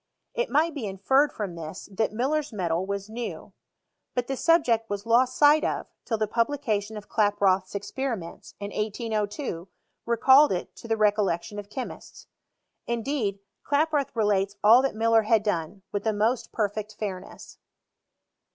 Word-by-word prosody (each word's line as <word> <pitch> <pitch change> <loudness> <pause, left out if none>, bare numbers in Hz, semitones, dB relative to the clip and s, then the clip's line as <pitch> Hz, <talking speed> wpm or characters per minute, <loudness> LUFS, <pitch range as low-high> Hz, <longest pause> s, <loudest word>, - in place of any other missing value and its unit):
It - - -1
might 315 +3 +2
be 265 -8 -4
inferred 265 +10 +2
from 200 -5 -4
this, 165 +1 -8
that 215 +3 0
Muller*s 280 +6 -1
metal 180 -3 -1
was 200 0 -3
new. 230 +2 -6 0.6
But 245 -1 0
the 270 - -3
subject 250 -8 +2
was 205 +1 -4
lost 250 +2 +3
sight 295 +1 +6
of, - - -1 0.2
till 225 - -1
the 215 - +1
pub 230 +2 +1
lication 220 -7 -2
of 210 - -9
Klaproth's 200 -3 +1
experiments, 205 -3 -5
in 200 0 -5
1802, 210 - -3 0.4
recalled 265 +5 +6
it 180 - -5
to - - -10
the 225 -1 0
recollection 205 -2 +1
of 205 0 -9
chemists. 255 +3 -8 0.6
Indeed, 235 -4 -2 0.2
Klaproth 295 -1 +1
relates 200 -2 +1
all 225 +4 +8
that 270 -3 -1
Muller 225 0 +4
had 220 0 +2
done, 190 -1 -2
with 205 -1 -2
the 220 - +1
most 220 +4 0
per 215 -2 +1
fect 210 +1 -7
fairness. 190 -3 -7
215 Hz, 155 wpm, -26 LUFS, 200-255 Hz, 0.6 s, all